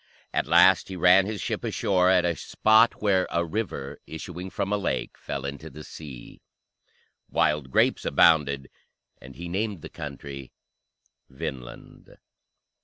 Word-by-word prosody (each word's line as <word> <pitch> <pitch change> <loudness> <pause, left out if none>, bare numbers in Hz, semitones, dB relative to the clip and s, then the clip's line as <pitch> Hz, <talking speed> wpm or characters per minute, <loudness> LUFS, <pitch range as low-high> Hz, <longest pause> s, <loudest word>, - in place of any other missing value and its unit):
At - - 0
last 95 -2 +5
he 95 - -7
ran 90 +2 +5
his 105 -2 -4
ship - - -3
ashore 90 -2 +1
at 90 -2 +4
a 85 -1 0
spot 110 +5 +3
where 95 -3 +2
"a 85 0 0
river, 80 -7 -4
issuing 90 +3 -7
from 100 +2 -2
a - - +2
lake, - - -2
fell 70 -1 -6
into 70 +3 -6
the 75 0 -11
sea." 70 -7 -11 0.9
Wild 75 -3 +1
grapes - - +2
abounded, 70 -5 +3 0.5
and 65 +1 -12
he 85 +1 -7
named 100 -1 -3
the - - -7
country 70 -2 -8 0.8
Vinland. 65 -3 -9
85 Hz, 140 wpm, -26 LUFS, 70-95 Hz, 0.9 s, last